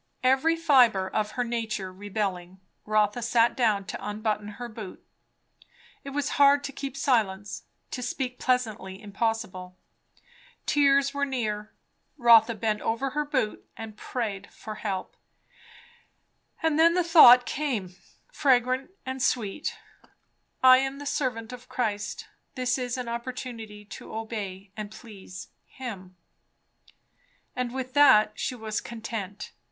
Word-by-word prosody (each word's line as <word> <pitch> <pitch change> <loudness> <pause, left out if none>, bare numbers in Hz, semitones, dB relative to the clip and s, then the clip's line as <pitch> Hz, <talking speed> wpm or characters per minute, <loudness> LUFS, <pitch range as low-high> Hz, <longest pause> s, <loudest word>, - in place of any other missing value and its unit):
Every 270 +6 +3
fibre 250 - +4
of 210 +1 -2
her 250 - 0
nature 225 -5 -3
rebelling, 190 -2 -4 0.3
Rotha 215 +2 +2
sat 235 0 +3
down 215 -6 +1
to - - -6
unbutton 210 0 -2
her 245 - -5
boot. 215 -4 -9 1.0
It 280 - -7
was 290 +1 -2
hard 280 0 +6
to 285 - -4
keep 275 0 -6
silence, 205 -7 0 0.3
to 250 - -4
speak 250 0 -3
"pleasantly" 220 -7 -1
impossible. 205 -3 -3 0.9
Tears 280 -1 +3
were 280 0 -1
near. 215 -6 -2 0.5
Rotha 235 -2 +6
bent 215 0 -1
over 245 +4 -1
her 300 +2 0
boot 260 -7 -2
and 220 -1 -8
prayed 210 -3 -4
for 215 - -8
help. 200 -3 -4 1.5
And 320 -1 +2
then 335 +1 +6
the 360 - +3
thought 255 -8 +8
came, 235 -11 -2 0.4
fragrant 255 0 +2 0.2
and 260 0 -4
sweet, 235 +2 -1 0.9
I 255 0 +9
am 270 +1 -2
the 285 - -8
servant 250 -4 -2
of 250 0 -11
Christ; 210 -4 -3 0.3
this 255 0 0
is 250 0 -3
an 250 -1 -4
opportunity 235 -3 -6
to 210 - -10
obey 205 -4 -5
and 210 -1 -5
please 205 -5 -11 0.2
him. 195 -8 -8 1.4
And 250 -1 -2
with 260 0 -5
that 215 -7 +6
she 255 - -2
was 220 -2 -3
content. 220 -4 -6
235 Hz, 130 wpm, -27 LUFS, 210-260 Hz, 1.5 s, I